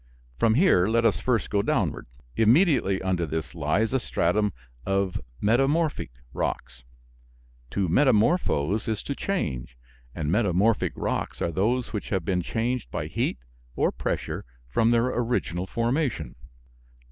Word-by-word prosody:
From 110 -1 +4
here 130 - +4
let 115 +1 +2
us 110 - +3
first 125 -4 0
go 100 - +2
downward. - - -1 0.3
Immediately 115 - +3
under 90 -3 0
this 80 +2 -4
lies 85 - 0
a 130 - +3
stratum 105 -1 +1 0.3
of 95 -2 0 0.2
"Metamorphic" 135 - +2 0.2
rocks. 60 +1 -3 0.9
To 95 +6 -1
metamorphose 110 - +2
is 110 -2 -2
to 140 - -3
change; 70 - -3 0.4
and 75 -2 -2
metamorphic 105 +1 +2
rocks - - -3
are 85 - -1
those 115 +8 0
which 105 - -4
have 95 -5 -1
been 90 -2 +1
changed 115 +6 -2
by 75 - -3
heat 75 - -1 0.4
or - - +2
pressure - - -3 0.2
from 110 - +2
their 115 0 +3
original 115 - -1
formation. 125 - -1
105 Hz, 135 wpm, -26 LUFS, 90-120 Hz, 0.9 s, From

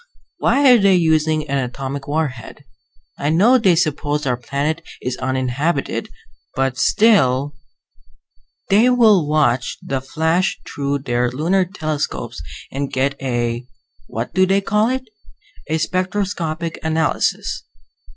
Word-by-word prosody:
Why 275 -1 +4
are 245 - +7
they 195 -2 +4
using 155 -2 +2
an 140 -1 0
atomic 135 +2 -5
warhead? 145 -2 -4 0.5
I 145 - 0
know 215 +11 +5
they 190 -6 +4
suppose 150 -2 -1
our 125 -2 +1
planet 140 +6 -2 0.2
is 125 0 -3
uninhabited, 130 +4 -1 0.5
but 135 -1 0
still 145 - +3 0.6
" - - -42
"They 220 +5 +5
will 220 -10 +4
watch 130 -5 +1
the 135 -1 -3
flash 160 +7 0
through 140 -1 -3
their 120 -1 0
lunar 170 +9 +1
telescopes 155 - -4 0.3
and 140 0 -3
get 135 +2 0
a 120 -2 -2 0.4
what 115 +2 -5
do 185 0 +3
they 195 +1 +3
call 210 +3 +1
it? 260 0 -3 0.6
a 160 - 0
spectroscopic 175 -2 -2
analysis. 160 -1 0
155 Hz, 125 wpm, -19 LUFS, 135-185 Hz, 0.6 s, are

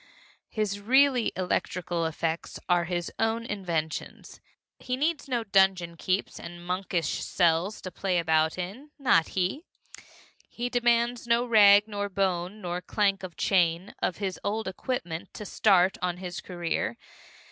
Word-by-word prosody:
His 205 -2 -2
really 260 +3 +4
electrical 175 -2 -1
effects 160 +1 -3
are 175 -1 +3
his 175 0 -3
own 225 +1 0
inventions. 170 -7 -4 0.4
He 250 0 -3
needs 305 +2 -1
no 245 -3 -1
dungeon 190 -4 +2
keeps 185 +3 -2
and 175 0 -9
monkish 180 -3 -2
cells 175 +3 +1
to 185 - -7
play 185 0 -1
about 160 -1 +2
in 200 +12 -6
not 245 - +3
he! 190 - 0 0.9
He 240 +1 -3
demands 240 -1 +1
no 235 +1 +3
rag 205 -3 +7
nor 205 -1 -3
bone 190 +1 -1
nor 175 -1 -3
clank 200 0 +1
of 185 -2 -8
chain 175 -1 +1
of 175 - 0
his 195 -3 -3
old 215 +1 -2
equipment 185 -3 -4
to 210 - -7
start 190 -3 +3
on 180 -1 -1
his 180 -1 -6
career. 175 +5 -3
190 Hz, 140 wpm, -27 LUFS, 175-220 Hz, 0.9 s, rag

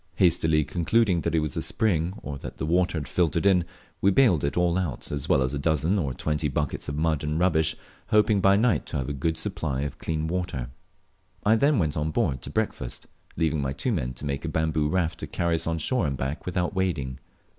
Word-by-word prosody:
Hastily 80 -3 +3
concluding 90 +3 +1
that - - -1
it 80 - +3
was 75 -4 -2
a - - -1
spring, 90 -5 0
or 70 -2 -5
that - - -8
the - - -2
water 85 +1 +1
had 75 -4 -4
filtered 85 +3 +1
in, 90 -4 +4 0.4
we 100 - +5
baled 100 - +4
it 70 - -1
all 90 -1 +2
out 90 -8 -3
as 70 -2 -3
well 65 - +4
as 65 +2 -2
a 70 - -2
dozen 80 +6 +1
or 70 -6 -1
twenty 75 +3 -1
buckets 75 0 -2
of 70 - -3
mud 80 -1 +1
and 75 +1 -1
rubbish, 80 -3 +2 0.3
hoping 105 -2 +3
by 95 +1 +5
night 115 +2 +2
to 80 - -3
have 65 0 -2
a - - -2
good 80 +4 -1
supply 75 -4 -2
of 75 +1 -4
clean 80 -1 -2
water. 80 -8 -3 0.7
I 110 +2 +5
then 140 +4 +3
went 80 -6 0
on 75 0 -1
board 65 -4 0
to - - -7
breakfast, 60 - -3 0.3
leaving 80 -2 +1
my 65 -1 -1
two 125 - -1
men 65 - -1
to 70 - -8
make 70 -1 -2
a - - -2
bamboo 80 -2 0
raft 85 -1 0
to - - -5
carry 85 -1 -1
us 80 0 0
on 80 0 0
shore 95 - 0
and 70 -2 -2
back 70 +7 -4
without 90 0 -1
wading. 80 -10 -1
80 Hz, 230 wpm, -26 LUFS, 75-90 Hz, 0.7 s, we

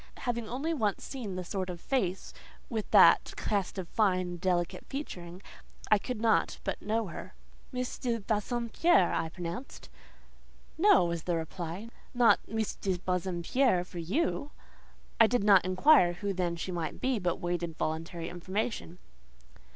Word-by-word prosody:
Having 235 -3 -2
only 280 +7 -2
once 215 - -1
seen 235 -9 -6
that 185 - -3
sort 185 0 -3
of 175 -1 -6
face, 190 -5 -2 0.4
with 220 -2 -3
that - - +6
cast 200 -2 -1
of 185 -2 -4
fine 195 -3 +2
and 175 -1 -6
delicate 180 0 0
featuring, 180 - -6 0.5
I 215 - +6
could 250 +1 -4
not 225 0 +2
but 195 - -3
know 220 +2 0
her. - - -9 0.4
"Miss 250 -1 -4
de 235 -2 -1
Bassompierre," 230 - +1
I 165 - -1
pronounced. 175 +9 -7 0.9
"No," 385 - +5
was 170 -2 -3
the 175 - 0
reply, 170 +5 -5 0.3
"not 240 -1 +5
Miss 220 -1 -2
de 190 -2 -2
Bassompierre 180 +4 +1
for 180 -1 -9
you!" 285 - -1 0.7
I 225 - +8
did 245 -2 +1
not 200 -3 +6
inquire 185 - +5
who 200 +3 -3
then 175 -2 -1
she 170 +2 -4
might 170 -2 -4
be, 255 -3 0
but 175 -2 0
waited 175 -2 -3
voluntary 165 +1 -3
information. 185 +1 -4
190 Hz, 150 wpm, -30 LUFS, 175-230 Hz, 0.9 s, I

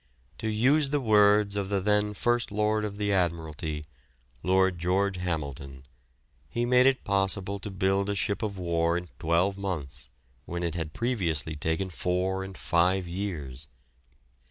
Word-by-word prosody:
To 110 - -3
use 135 +7 +3
the 145 +1 +1
words 105 -3 +4
of 100 -2 -2
the 100 -1 +1
then 105 +1 +1
First 120 +1 +1
Lord 105 +1 +1
of 100 -1 -5
the 105 -1 0
Admiralty 80 -4 -1 0.6
Lord 95 -1 +2
George 95 +2 +1
Hamilton 70 -6 -4 0.6
he 120 0 -1
made 125 +1 +5
it 135 -1 +2
possible 100 0 0
to 100 - -6
build 95 +1 +1
a 100 - 0
ship 100 +1 -1
of 105 -3 -3
war 85 -1 +1
in 90 -1 -6
twelve 85 +4 +1
months 85 -9 -4 0.4
when 85 +4 -4
it 85 -2 -1
had 80 -2 -4
previously 85 - -1
taken 80 +5 -1
four 90 +2 -1
and 95 -1 -8
five 90 +2 +2
years. 80 -8 -5
95 Hz, 155 wpm, -28 LUFS, 85-105 Hz, 0.6 s, made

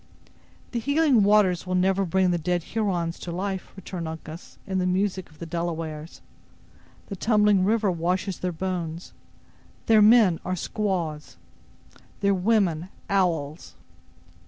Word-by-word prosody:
"The 240 - -1
healing 285 -1 +3
waters 200 -3 +3
will 185 - -1
never 190 +1 +2
bring 185 +1 +2
the 175 - 0
dead 175 +1 -1
Hurons 175 -6 -2
to 175 - -6
life," 190 +2 -4
returned 180 -3 -6
Uncas, 160 +1 -9
in 190 -1 -1
the 180 - 0
music 185 0 -1
of 155 - -20
the 170 - -7
Delawares; 165 -2 -5 0.8
"the 200 - -6
tumbling 210 -1 +3
river 210 0 +2
washes 180 +2 -2
their 180 - -2
bones; 170 -1 -4 0.7
their 220 -1 +5
men 210 -6 +6
are 185 - -2
squaws: 175 -6 -3 0.8
their 200 0 +3
women 185 -4 +1 0.2
owls. 165 -6 -1
185 Hz, 135 wpm, -25 LUFS, 170-200 Hz, 0.8 s, men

